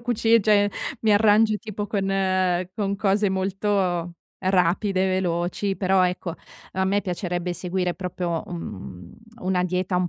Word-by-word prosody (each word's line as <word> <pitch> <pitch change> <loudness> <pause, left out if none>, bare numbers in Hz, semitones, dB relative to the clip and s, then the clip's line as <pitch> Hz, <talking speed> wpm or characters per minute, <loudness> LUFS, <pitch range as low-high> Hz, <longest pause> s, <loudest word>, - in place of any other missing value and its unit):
cuci 230 -1 +3
cioè, 205 -1 +4 0.3
mi 220 -1 +3
arrangio 215 +1 +4
tipo 210 -2 -5
con 195 -2 -1 0.7
con 200 -2 -1
cose 200 0 +2
molto 190 -2 -1 0.3
rapide 185 +1 +2
e 190 - +1
veloci, 180 +3 -1
però 190 -1 +3
ecco, 180 -1 -3 0.4
a 190 0 0
me 200 +2 +2
piacerebbe 180 -1 -3
seguire 180 +1 -2
proprio, 175 -2 -3
un 95 - -8 0.3
una 185 -1 +1
dieta 180 +1 -1
un 180 -1 +1
190 Hz, 135 wpm, -24 LUFS, 180-205 Hz, 0.7 s, cioè